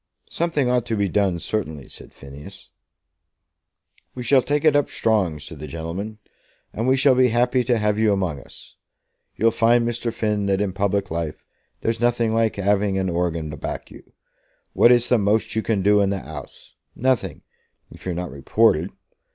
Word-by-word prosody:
"Something 165 -6 0
ought 125 -1 +1
to 115 - -1
be 100 -1 +1
done, 95 -2 +1
certainly," 80 -7 -4
said - - -12
Phineas. 70 +1 -12 1.4
"We 125 - -5
shall 130 +2 +4
take 145 +3 -1
it 155 -2 +5
up 145 - +2
strong," 100 -8 +1
said 75 +1 -10
the 75 - -7
gentleman, 85 +8 -6 0.6
"and 115 +3 -2
we 130 +1 +4
shall 135 0 +5
be 130 0 +4
happy 125 +2 +2
to 120 0 +2
have 105 -1 0
you 110 -1 +3
among 95 -7 -1
us. - - -15 0.6
You'll 115 +1 +3
find, 115 +1 +3
Mr. 120 0 -2
Finn, 105 -3 -1
that 95 -1 +1
in 100 -2 -1
public 100 -1 -1
life 80 -2 -4 0.4
there's 115 0 -1
nothing 120 -2 +1
like 115 -1 +1
having 100 0 +1
a 95 -2 -1
horgan 85 -3 -2
to 75 - -7
back - - -6
you. - - -15 0.6
What 120 - +6
is 120 0 +4
the 125 -2 +3
most 105 +2 0
you 110 - +1
can 100 -1 -1
do 105 +1 +4
in 100 - +2
the 100 - -1
'Ouse? 80 -1 -10 0.2
Nothing, 130 -1 -1 0.5
if - - -14
you're 90 - -2
not 90 +1 -4
reported. 85 +5 +2
105 Hz, 185 wpm, -22 LUFS, 90-120 Hz, 1.4 s, What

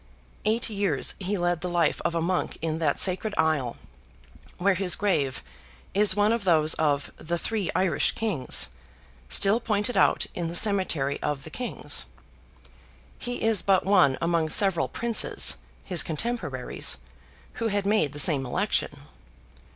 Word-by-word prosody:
Eight 225 +2 +1
years 200 -2 0
he 200 +1 -2
led 175 -1 -1
the 180 - -3
life 170 -3 0
of 170 0 -1
a 165 - -1
monk 180 +1 -2
in 160 0 -3
that 150 -4 0
sacred 200 +3 +2
Isle, 150 -7 0 0.8
where 195 +2 +2
his 185 -1 +2
grave 145 - -1 0.5
is 200 -1 +3
one 210 +2 +2
of 230 -2 -2
those 160 -4 +3
of 145 -2 -1
"the 170 +2 -4
three 210 +1 -3
Irish 185 -2 +1
Kings," 205 - 0 0.6
still 200 - +3
pointed 215 +1 -2
out - - +2
in 170 -1 -4
the 170 - -5
cemetery 175 -9 +1
of 145 -2 -3
the 160 - -9
Kings. 245 +6 -1 1.1
He 245 -1 -5
is 225 -2 +3
but 195 -2 +2
one 180 -9 +3
among 165 -1 0
several 185 -1 +4
Princes, 235 -1 +3 0.3
his 180 -4 +4
cotemporaries, 160 - -3 0.6
who 230 - +1
had 205 -2 -2
made 205 -8 +1
the 145 - -7
same 145 -4 +2
election. 125 - -2
180 Hz, 150 wpm, -25 LUFS, 160-205 Hz, 1.1 s, several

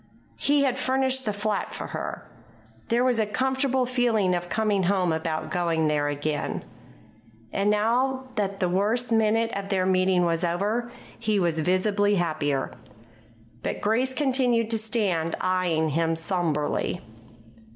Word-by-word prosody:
He 285 0 +3
had 260 -1 0
furnished 260 0 +1
the 210 - +1
flat 210 0 -2
for - - -5
her. - - -6 0.6
There 240 +1 +2
was 250 -3 +2
a 215 - +1
comfortable 265 +2 +1
feeling 235 -7 +1
of 175 0 -2
coming 210 0 +1
home 185 -1 +1
about 160 0 -3
going 165 -3 +1
there 145 -1 +1
again. 145 - -2 0.9
And, 200 +1 +1
now 245 +5 +1
that 200 -1 -2
the 180 - +1
worst 215 +7 0
minute 225 +1 +2
of 200 0 -4
their 190 -2 +1
meeting 185 -1 +3
was 165 0 0
over, 205 +8 -1 0.3
he 215 -3 +1
was 170 -3 0
visibly 200 +4 +2
happier. 155 -6 -1 0.9
But - - -3
Grace 250 +5 +1
continued 250 -5 +1
to 225 - +1
stand 200 -7 0
eyeing 180 -4 +1
him 165 +2 +1
somberly. 165 -1 -1
200 Hz, 140 wpm, -25 LUFS, 175-235 Hz, 0.9 s, He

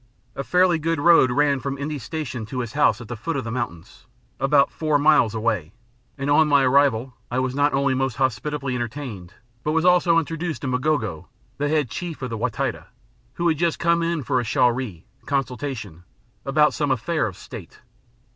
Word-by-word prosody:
A 135 - -3
fairly 180 0 +3
good 165 0 -1
road 165 -4 +6
ran 140 +2 +2
from 140 0 -4
N'dii 145 0 -4
Station 130 -7 -5
to 125 +2 -3
his 120 -1 -6
house 140 -6 +2
at 120 - -9
the 120 - -5
foot 155 +10 -4
of 135 - -2
the 115 - -5
mountains, 115 -9 -6 0.3
about 140 +1 +3
four 155 -2 +1
miles 145 -7 +4
away, 105 -7 -1 0.4
and 140 0 -3
on 150 +2 +4
my 140 -2 +4
arrival 130 -2 +3 0.2
I 125 - -2
was 130 0 0
not 145 +2 +2
only 140 0 +2
most 135 -2 -1
hospitably 135 +1 -1
entertained 120 -7 -5 0.3
but 150 - 0
was 165 +1 +1
also 180 -2 +4
introduced 165 -2 -2
to - - -2
M'gogo, 125 - -1 0.3
the 145 0 0
Head 150 -6 0
Chief 165 +8 -5
of 125 - -4
the 115 - -3
Wa - - 0
Taita, - - -3 0.5
who 175 - 0
had 160 -3 +1
just 170 -2 +1
come 170 0 +2
in 165 -3 -1
for 125 - +1
a - - -1
shauri 120 -6 0 0.2
(consultation) 130 - -3 0.4
about 150 +2 +3
some 145 -2 -1
affair 135 +3 0
of 95 - -8
State. - - -11
140 Hz, 195 wpm, -23 LUFS, 120-155 Hz, 0.5 s, road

